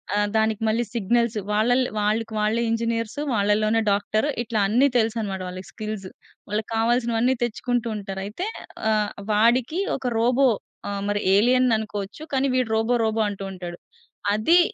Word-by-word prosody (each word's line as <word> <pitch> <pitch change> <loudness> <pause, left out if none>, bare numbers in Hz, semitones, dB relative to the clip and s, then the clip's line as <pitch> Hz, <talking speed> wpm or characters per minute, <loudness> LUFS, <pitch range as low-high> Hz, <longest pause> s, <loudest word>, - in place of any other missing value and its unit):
ఆహ్, 205 0 +2
దానికి 220 0 +1
మళ్ళీ 230 +2 +1
సిగ్నల్స్ 235 +1 +1
వాళ్ళల్లో 245 +4 +2
వాళ్ళకి 220 +2 0
వాళ్ళే 215 +2 +1
ఇంజినీర్సు 230 +3 -1
వాళ్ళలోనే 215 +2 +2
డాక్టర్, 215 +5 +1 0.2
ఇట్లా 225 -2 -2
అన్నీ 250 +7 +4
తెలుసన్నమాట 220 -4 -1
వాళ్ళకి 185 0 -8
స్కిల్స్. 215 -3 -5 0.4
వాళ్ళకి 215 +2 -2
కావాల్సినవన్నీ 235 +2 +2
తెచ్చుకుంటూ 240 0 -1
ఉంటారు. 195 -2 -5
అయితే, 345 - -4 0.5
ఆహ్, 210 -1 +1 0.2
వాడికి 245 - +3 0.2
ఒక 255 -2 -2
రోబో 250 +3 +4 0.4
ఆహ్, 200 0 -3
మరి 205 0 0 0.2
ఎలియన్ 250 +3 +4
అనుకోవచ్చు. 210 +5 -6
కానీ, 270 +1 +2
వీడు 250 -3 +1
రోబో, 230 +2 +2
రోబో 220 0 0
అంటూ 200 -1 -6
ఉంటాడు. 175 -2 -7 0.6
అది 325 +12 +4
220 Hz, 145 wpm, -24 LUFS, 210-240 Hz, 0.6 s, అన్నీ